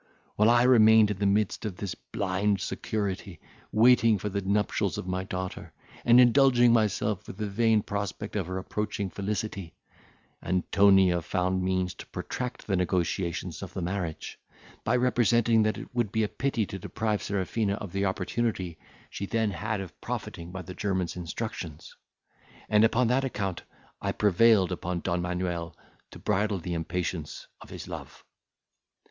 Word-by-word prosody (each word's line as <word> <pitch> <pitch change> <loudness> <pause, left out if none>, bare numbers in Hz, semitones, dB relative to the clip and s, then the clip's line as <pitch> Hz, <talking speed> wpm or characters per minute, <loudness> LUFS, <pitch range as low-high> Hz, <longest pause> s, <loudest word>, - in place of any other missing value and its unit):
While 105 +2 +4
I 120 0 +5
remained 110 -4 +6
in 100 - -4
the 100 - +2
midst 100 +1 +1
of 105 -5 -4
this 100 -4 -4
blind 100 +1 -1
security, 95 -5 -3 0.3
waiting 115 -1 +5
for 105 +2 -3
the 100 0 -2
nuptials 100 +1 0
of - - -4
my 95 0 -2
daughter, 95 -1 -5 0.3
and 120 +1 +6
indulging 125 -1 +6
myself 105 -3 +1
with - - -8
the 105 - -2
vain 110 +1 +2
prospect 100 +1 -4
of 95 -5 -1
her 95 0 -3
approaching 100 0 -3
felicity, 100 -3 -4 0.7
Antonia 95 0 +4
found 90 +2 -1
means 95 -1 0
to - - -11
protract 125 -1 -5
the 100 - 0
negotiations 90 -2 -1
of 95 -2 -8
the 95 - -2
marriage, 90 -3 -4 0.4
by 115 - +1
representing 120 -2 +3
that 110 0 +1
it - - -9
would 120 -5 0
be 110 0 +1
a - - +1
pity 125 -2 -1
to 95 - -7
deprive 105 +3 -2
Serafina 100 +1 -1
of 100 -3 -7
the 100 0 0
opportunity 95 -2 -2 0.3
she 100 - -5
then 110 -1 0
had 105 +3 -3
of 95 - -10
profiting 85 +1 -5
by 95 0 -6
the 90 - -8
German's 95 -2 -2
instructions; 85 -3 -6 0.7
and, 105 0 +4
upon 115 +2 +3
that 130 +2 +2
account, 100 -8 -3 0.4
I - - -1
prevailed 105 -1 +4
upon 90 -1 -3
Don 85 -1 -1
Manuel 90 -1 -3 0.3
to - - -12
bridle 105 0 0
the 90 0 -4
impatience 85 -1 -3 0.2
of - - -12
his - - -8
love. - - -9
100 Hz, 160 wpm, -28 LUFS, 90-110 Hz, 0.7 s, remained